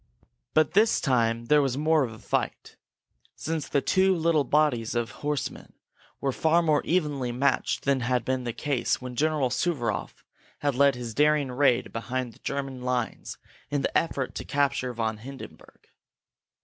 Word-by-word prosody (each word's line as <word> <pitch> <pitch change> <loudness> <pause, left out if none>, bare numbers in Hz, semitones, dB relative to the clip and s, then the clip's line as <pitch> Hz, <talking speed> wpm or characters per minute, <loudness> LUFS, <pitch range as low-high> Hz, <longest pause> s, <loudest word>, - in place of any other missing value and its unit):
But 155 -1 +3
this 215 +3 +4
time 115 -3 +1
there 150 +4 +4
was 135 -2 -1
more 155 0 +3
of 120 - -3
a 110 - -10
fight, - - -3 0.6
since 160 -2 -4
the 140 - +1
two 190 0 +3
little 165 -3 +2
bodies 130 -5 +1
of 120 -1 -1
horsemen 150 -1 -3 0.5
were 135 - 0
far 160 +5 +2
more 155 -3 +3
evenly 145 -7 0
matched 130 +2 0
than 140 -1 +2
had 125 -1 0
been 130 -1 -1
the 120 - -2
case 130 +2 -1
when 125 -1 -7
General 150 -2 +1
Suvaroff 120 - -2 0.4
had 145 -1 +1
led 140 +1 +4
his 120 -2 -6
daring 150 0 +2
raid 125 -1 +2
behind 125 +1 -3
the - - -21
German 135 -2 -4
lines 125 -2 -3 0.3
in 145 -1 -1
the - - -2
effort 140 -6 0
to - - -5
capture 140 -3 0
von 110 -2 -2
Hindenburg. 135 +4 -12
135 Hz, 160 wpm, -27 LUFS, 125-150 Hz, 0.6 s, this